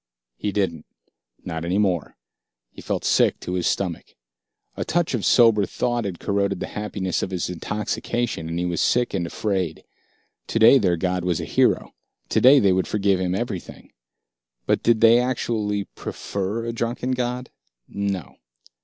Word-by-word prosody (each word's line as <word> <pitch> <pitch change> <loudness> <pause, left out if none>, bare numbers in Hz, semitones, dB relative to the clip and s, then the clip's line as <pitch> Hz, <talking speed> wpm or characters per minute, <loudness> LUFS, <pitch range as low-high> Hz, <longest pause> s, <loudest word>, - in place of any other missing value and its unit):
He 105 - -3
didn't, 95 -6 -2 0.6
not 80 0 -4
any 90 +3 0
more. 95 -6 0 0.5
He - - -12
felt - - -3
sick - - +3
to 90 - -4
his 90 -2 0
stomach. 90 -4 -2 0.6
A - - -2
touch 170 -2 0
of 115 -5 -1
sober 115 -5 +5
thought 120 -2 -1
had 95 -4 -4
corroded 100 -1 0
the - - -3
happiness 100 -3 -2
of - - -2
his 90 -1 -3
intoxication, 105 0 -3
and 85 - -3
he 90 - -1
was 85 -2 -1
sick 125 0 +2
and 85 -4 -1
afraid. 95 -4 -2 0.6
Today 115 +4 +6
their 90 -6 +1
god 90 +1 -1
was 90 -3 0
a - - -4
hero, - - +1 0.4
today 135 +3 +6
they 100 -7 +4
would 95 0 0
forgive 100 -3 +1
him 90 0 -1
everything. 100 -5 -5 0.7
But - - +1
did 115 -1 +2
they 115 +1 +7
actually 110 -5 -1
prefer 100 +3 -5
a 115 - -3
drunken 120 +2 -2
god? 125 0 -2 0.4
No. 100 -6 -4
100 Hz, 160 wpm, -23 LUFS, 90-115 Hz, 0.7 s, they